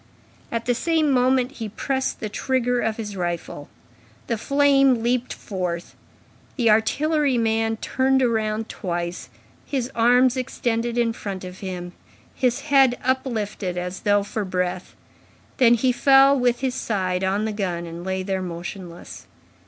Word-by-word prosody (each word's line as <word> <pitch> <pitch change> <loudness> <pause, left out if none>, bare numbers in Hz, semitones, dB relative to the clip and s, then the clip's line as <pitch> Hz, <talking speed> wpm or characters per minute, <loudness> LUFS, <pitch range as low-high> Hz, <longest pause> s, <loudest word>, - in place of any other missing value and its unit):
At 230 0 -2
the 245 - +2
same 315 +3 +1
moment, 255 0 +2
he 225 -6 -6
pressed 265 +5 -2
the 215 - -2
trigger 245 +3 0
of 220 -2 -1
his 210 -3 -5
rifle. 175 -5 -4 0.6
The 230 - -1
flame 275 -3 +3
leaped 245 +1 0
forth. 180 -4 -4 0.6
The 235 -5 +3
artillery 285 +5 +2
man 225 0 +1
turned 265 +3 +1
round 220 -2 0
twice, 175 -2 -4 0.3
his 260 -3 -3
arms 245 +2 +4
extended 240 -2 -2
in 235 -1 +2
front 195 -4 -6
of 185 0 -9
him, 180 -2 -6 0.4
his 250 +1 0
head 270 -4 +4
uplifted, 220 -8 -2
as 180 +1 -4
though 205 -1 +2
for 210 +1 -3
breath, 180 -1 -3 0.6
then 240 -2 +6
he 250 +2 +2
fell 270 +2 +6
with 245 -2 +1
his 260 -2 0
side 185 -6 -1
on 195 +3 0
the 220 - -2
gun, 180 -4 -3
and 170 +1 -8
lay 190 0 -2
there 190 0 -2
motionless. 175 0 -8
225 Hz, 145 wpm, -23 LUFS, 190-255 Hz, 0.6 s, then